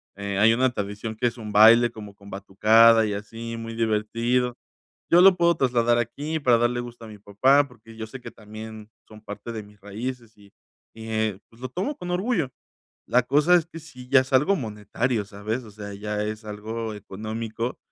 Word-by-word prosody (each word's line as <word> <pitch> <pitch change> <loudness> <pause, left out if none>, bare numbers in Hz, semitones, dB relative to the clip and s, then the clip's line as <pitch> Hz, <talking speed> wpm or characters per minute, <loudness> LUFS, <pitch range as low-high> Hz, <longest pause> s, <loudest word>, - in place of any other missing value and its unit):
eh 100 0 -4
Hay 110 +2 +6
una 130 0 +2
tradición, 105 +1 -5
que 120 - +1
es 120 +1 -4
un 110 -2 -7
baile, 115 +3 +7
como 105 -3 -11
con 100 0 -15
batucada 110 +3 +5
y 105 - -2
así, 115 +3 -6
muy 115 0 -7
divertido. 115 +3 0 0.5
Yo 175 +1 +6
lo 190 -1 +7
puedo 170 0 +3
trasladar 120 -2 +2
aquí, 145 +7 -3
para 125 -4 +4
darle 120 +1 +1
gusto 120 -1 -10
a - - -10
mi 105 -1 -11
papá, 130 +8 +3
porque 115 -2 -16
yo 110 - -5
sé 130 +3 -10
que - - -8
también, 110 0 -11 0.2
son 110 0 -14
parte 105 +3 -8
de 110 -2 -6
mis 105 0 -19
raíces, 115 +2 -7
y 100 -1 -19 0.4
y, 110 0 -10
eh, 110 -3 -1
pues 115 - -21
lo 130 - -5
tomo 195 - -3
con 180 0 -6
orgullo. 180 - -1 0.6
La 125 0 +3
cosa 145 +7 +3
es 170 - +4
que, 165 -1 -10
sí 125 -5 -13
ya 135 -2 +7
es 130 +1 -6
algo 175 +10 +4
monetario, 110 0 -2
¿sabes? 105 +5 -5
O 110 - -12
sea, 100 -1 -9
ya 105 +1 -3
es 110 +1 -5
algo 110 +1 -5
económico. 110 +4 -5
115 Hz, 200 wpm, -24 LUFS, 105-125 Hz, 0.6 s, baile